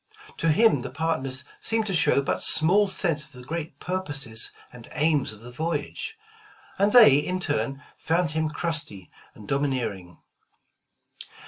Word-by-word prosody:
To 165 - +1
him, 160 - +4
the 130 - -6
partners 135 -2 -2 0.2
seemed 225 -1 0
to 195 - -2
show 155 -5 +3
but - - -1
small 195 +6 +4
sense 165 -5 0
of - - -16
the 125 -1 -11
great 160 +4 -5
purposes 145 -11 -1 0.2
and 120 -2 -13
aims 150 -4 +1
of 110 0 -13
the 120 +1 -10
voyage, 160 - -4 0.6
and 200 +1 +3
they 220 - +8
in 180 +5 -2
turn, 140 -4 -2 0.2
found 165 -1 0
him 160 0 -1
crusty 150 - -4 0.2
and 105 - -13
domineering. 125 - -2
150 Hz, 145 wpm, -25 LUFS, 130-170 Hz, 0.6 s, they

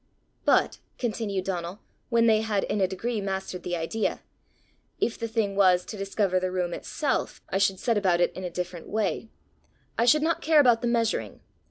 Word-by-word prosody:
"But," - - +3 0.2
continued 210 -5 -2
Donal, 180 0 -3 0.3
when 235 -1 +3
they 220 -1 +4
had 210 -3 0
in 205 - -1
a 190 - +4
degree 215 +4 -3
mastered 190 -2 -4
the 175 0 -3
idea, 175 +7 -2 0.8
"if 235 - 0
the 230 - -4
thing 220 -3 -1
was, 185 -2 +4
to - - -7
discover 195 -1 0
the 185 0 -1
room 180 -1 -2
itself, 285 - -2
I 195 - 0
should 195 -1 +2
set 230 -4 +1
about 180 -4 +2
it 175 - +2
in 185 - -7
a 180 - -3
different 180 -1 -5
way; 220 +1 -1 0.7
I 230 - +4
should 300 +5 +5
not 335 +1 +1
care 315 -1 +4
about 245 -5 +5
the 240 - 0
measuring. 230 -2 0
200 Hz, 190 wpm, -27 LUFS, 185-230 Hz, 0.8 s, should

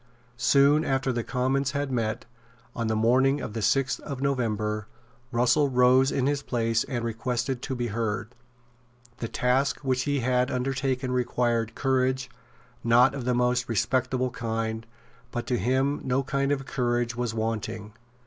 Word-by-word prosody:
Soon 140 +4 +4
after 135 -2 0
the 120 -1 -2
Commons 135 +3 0
had 140 -1 -2
met, 115 -3 -2 0.5
on 115 -1 -2
the 110 - 0
morning 130 +5 +3
of 105 - -5
the 115 - -3
sixth 135 +6 +1
of 140 -3 -6
November, 110 -6 -1 0.4
Russell 125 +4 +3
rose 130 +1 +4
in 130 - 0
his 140 0 0
place 115 -4 0
and 120 -3 -3
requested 125 +2 -2
to 130 - -3
be 120 -1 -2
heard. 110 0 -3 0.8
The 115 - -4
task 125 +5 +1
which 130 -2 0
he 145 -2 0
had 125 +1 +1
undertaken 130 0 -1
required 120 -2 0
courage 130 -1 0 0.5
not 120 +3 +5
of 135 -3 -5
the 125 -1 +1
most 125 0 +1
respectable 130 +3 0
kind; 115 -1 -3 0.4
but 120 -1 -4
to 125 -1 0
him 130 +6 +1
no 130 +1 0
kind 140 +1 0
of 135 -1 -1
courage 120 -3 -1
was 120 -2 -2
wanting. 110 -1 -3
125 Hz, 155 wpm, -26 LUFS, 115-135 Hz, 0.8 s, not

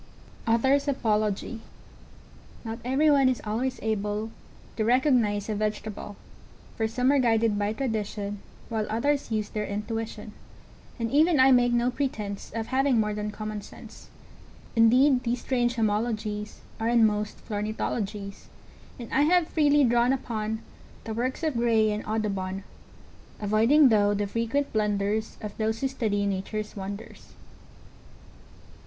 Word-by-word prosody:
Author's 265 +5 +3
Apology. 215 -3 -1 1.0
Not 225 +1 -5
every 275 +5 +3
one 275 -2 +5
is 255 - -1
always 250 +5 -2
able 215 0 -2 0.5
To 220 - +1
recognize 235 -4 +2
a 220 - -1
vegetable, 210 0 -4 0.6
For 220 - 0
some 250 +4 +1
are 285 - +3
guided 225 -3 +2
by 205 +1 0
tradition, 210 -4 -3 0.3
While 220 -2 -2
others 280 +6 0
use 215 -2 -1
their 210 -1 -3
intuition, 215 +1 -4 0.7
And 230 -1 -2
even 310 +2 +4
I 265 +1 +7
make 245 -1 +4
no 240 +1 +2
pretense 215 -7 -4
Of 225 -1 -2
having 260 -1 +2
more 210 -1 0
than 210 0 -3
common 215 0 -5
sense; - - -13 0.7
Indeed 250 +4 +5
these 240 0 -2
strange 240 -2 0
homologies 215 -1 -2 0.2
Are 225 +1 0
in 235 -1 +5
most 210 0 -1
flornithologies, 210 -1 -3 0.5
And 235 -2 -8
I 275 - +4
have 340 +2 +3
freely 295 -2 +4
drawn 240 +1 +3
upon 220 -4 -3 0.4
The 225 - -5
works 255 +7 -2
of 315 -2 +1
Gray 230 -2 +2
and 210 0 -3
Audubon, 195 -3 -2 0.8
Avoiding 225 +8 +4
though 205 -2 +3
the 205 0 0
frequent 230 +7 -1
blunders 210 0 0
Of 210 -1 -6
those 220 0 -1
who 270 - +2
study 215 -6 -1
Nature's 200 +2 -3
wonders. 200 +3 -8
225 Hz, 135 wpm, -27 LUFS, 210-250 Hz, 1.0 s, I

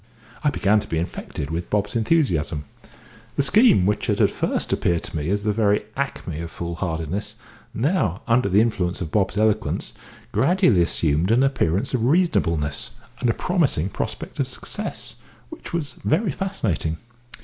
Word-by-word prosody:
I 150 - +4
began 105 -5 +2
to - - -7
be 80 - -2
infected 80 -3 -4
with 85 +2 -3
Bob's 105 +1 0
enthusiasm. 100 - +1 0.7
The 140 - +2
scheme, 210 - +5
which 105 +1 0
had - - +1
at - - +4
first - - -1
appeared 85 -1 +1
to - - -6
me 75 +1 -2
as 100 +1 0
the 105 -1 +1
very 105 -1 +2
acme 125 - -3
of 85 - -5
fool 85 0 -5
hardiness, 85 +3 -3 0.4
now, 115 - 0
under 115 -2 +3
the 100 +3 +5
influence 95 -6 0
of 85 -5 -4
Bob's 100 -1 +1
eloquence, 110 0 0 0.4
gradually 170 - +3
assumed 85 0 +1
an 120 +4 +4
appearance 125 - +1
of 120 -3 +1
reasonableness, 85 - +1 0.2
and 125 - +1
a - - +3
promising 150 - +1
prospect - - -5
of - - +1
success, - - -6 0.3
which - - -9
was 150 -6 -2
very 180 +4 +2
fascinating. 110 - -2
105 Hz, 160 wpm, -23 LUFS, 85-135 Hz, 0.7 s, scheme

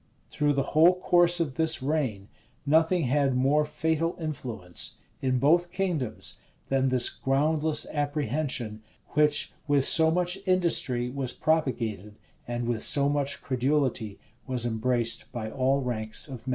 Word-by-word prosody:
Through 145 -1 0
the 140 -1 0
whole 170 +4 +5
course 175 -1 +3
of 150 -6 -3
this 160 -4 +2
reign, 130 -9 -2 0.4
nothing 160 +4 +2
had 135 0 +1
more 140 +4 +2
fatal 160 +3 -2
influence, 120 - -1 0.2
in 130 -1 0
both 170 +7 +2
kingdoms, 170 - -2 0.3
than 135 0 +1
this 125 -2 +4
groundless 150 +3 0
apprehension, 145 -6 -2 0.3
which 150 0 +1
with 140 -2 +3
so 160 +1 +7
much 180 +3 0
industry 165 -9 +1
was 130 -2 -3
propagated, 115 - -2 0.3
and 120 0 -4
with 115 -2 -2
so 140 -1 +4
much 140 -1 -1
credulity 130 -5 -1 0.3
was 125 -2 -2
embraced, 115 0 -1
by 110 -3 -6
all 135 +1 0
ranks 110 -2 -2
of 130 -2 -10
men. - - -2
140 Hz, 140 wpm, -26 LUFS, 125-155 Hz, 0.4 s, so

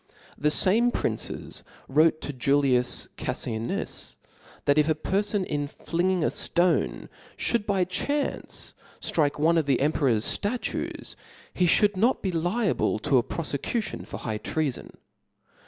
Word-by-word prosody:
The 150 - +1
fame 215 +10 +4
princes - - -3 0.3
wrote 155 +3 +3
to 145 - -4
Julias 130 -1 +2
Caffianus, 110 +1 -3 0.5
that 145 +1 +4
if 150 +1 +3
a 155 - +3
perfon 200 +4 0
in 145 -3 -2
flinging 175 +4 -1
a - - +3
ftone 165 - +1 0.3
ftiould 230 -3 0
by 195 -3 +2
chance 280 +11 -2 0.3
ftrike 150 -2 0
one 165 +2 +4
of 155 - -2
the 135 -3 +3
emperor's 135 -6 +2
ftatues, 230 +4 -2 0.4
he 180 - +2
fliould 205 +4 +4
not 235 +7 +2
be 190 - 0
liable 175 - +1
to 130 +4 +3
a - - +3
profecution 165 - -3
for - - -6
high 110 -2 -3
treafon 150 -1 -2
(^). - - -17
160 Hz, 140 wpm, -26 LUFS, 140-190 Hz, 0.5 s, fame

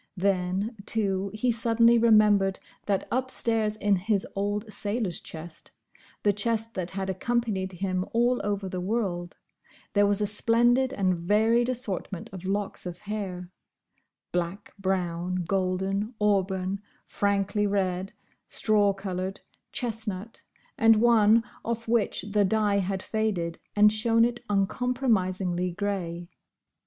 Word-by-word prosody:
Then, 195 +3 0
too, 200 -3 0
he 215 +4 0
suddenly 230 +1 +4
remembered 210 -4 +4 0.3
that 200 -2 0
upstairs 225 -4 0
in 205 -2 +2
his 200 +1 0
old 205 +2 -2
sailor's 205 -4 -1
chest; 160 +1 -8 0.5
the 205 - +4
chest 225 +2 -1
that 185 -2 -3
had 190 0 -4
accompanied 190 -1 -1
him 185 0 -1
all 240 +2 +2
over 200 -1 -2
the 185 -1 -4
world, 185 -4 -2 0.6
there 205 0 +4
was 200 0 +1
a 210 - +1
splendid 240 +5 +3
and 190 -7 +1
varied 220 +7 +2
assortment 210 -7 -4
of 185 -1 -8
locks 200 -1 -2
of 175 -1 -6
hair: 190 -3 -5 0.8
black, 175 +3 -3
brown, 180 -1 -1
golden, 195 +4 -1
auburn, 195 -1 +1 0.2
frankly 200 +1 0
red, 190 -1 -1 0.4
straw 205 -2 +2
coloured, 190 0 -4 0.3
chestnut, 225 -3 -3 0.4
and 225 0 +7
one 225 0 +5 0.2
off 230 0 -3
which 225 -5 +1
the 205 +1 +1
dye 205 0 +2
had 190 0 -2
faded 195 -7 -1 0.2
and 210 0 +6
shown 230 +1 +3
it 240 0 -2
uncompromisingly 195 -4 0
grey. 175 -3 -3
205 Hz, 125 wpm, -27 LUFS, 185-225 Hz, 0.8 s, and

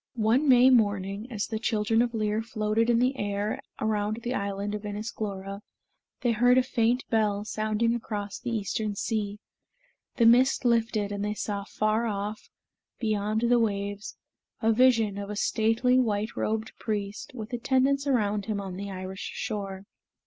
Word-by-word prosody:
One 240 +6 +2
May 255 +1 +7
morning, 205 -1 +1
as 210 -3 -2
the 220 - -4
children 225 0 +1
of 240 -1 -1
Lir 215 0 0
floated 220 0 0
in 235 - +4
the 250 +3 +2
air 205 +1 -2 0.2
around 215 0 0
the 245 - -2
island 200 -1 -2
of 210 0 -4
Inis 210 +2 -4
Glora, 200 -1 -5 0.6
they 245 -3 +2
heard 245 +3 +4
a 255 - +5
faint 240 0 +1
bell 210 -2 +1
sounding 215 +2 0
across 205 -3 -4
the 245 - -5
eastern 215 -1 -2
sea. 205 -1 -2 0.8
The 235 - +3
mist 250 +3 +5
lifted, 225 -3 +1
and 200 0 -3
they 210 +1 -2
saw 205 -1 -3
afar 215 +3 0
off, 210 0 -4 0.5
beyond 215 -1 0
the 240 0 +4
waves, 205 -2 -2 0.4
a 225 0 +3
vision 225 -4 +3
of 200 0 -6
a 210 - -4
stately 225 +4 +2
white 215 -2 0
robed 220 0 -2
priest, 205 -1 -4
with 225 0 -7
attendants 265 +3 +1
around 210 -6 +1
him 210 -2 -1
on 190 -2 -6
the 200 +1 -5
Irish 185 0 -6
shore. 195 -2 -4
215 Hz, 165 wpm, -27 LUFS, 205-235 Hz, 0.8 s, May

